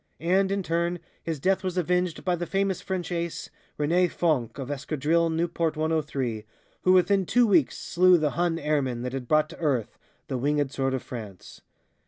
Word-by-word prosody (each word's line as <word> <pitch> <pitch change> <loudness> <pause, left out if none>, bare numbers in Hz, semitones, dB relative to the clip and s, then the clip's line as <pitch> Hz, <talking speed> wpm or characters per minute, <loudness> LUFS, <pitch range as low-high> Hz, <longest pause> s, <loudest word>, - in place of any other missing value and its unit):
And, 190 +4 +2
in 195 -1 -1
turn, 170 +1 0 0.2
his 160 -3 -4
death 190 +5 +1
was 185 -1 -3
avenged 180 -1 0
by 180 -1 +2
the 175 0 -4
famous 195 -1 0
French 185 -2 -4
Ace, 170 -1 -3 0.3
René 170 +4 +2
Fonck 135 -11 0
of 135 0 -5
Escadrille 155 +4 0
Nieuport 165 -1 -1
103, 145 -8 -1 0.4
who 185 - +4
within 190 +2 +4
two 245 0 +4
weeks 175 - +3
slew 180 +1 +4
the 155 -3 0
Hun 170 -1 0
airman 140 -7 -1
that 125 0 -4
had 130 -2 -4
brought 155 +2 +3
to - - -12
earth 140 -9 -1 0.3
the 130 - -3
Wingèd 145 +1 0
Sword 135 -1 -1
of 130 - -4
France. 110 -8 -9
165 Hz, 180 wpm, -26 LUFS, 140-180 Hz, 0.4 s, who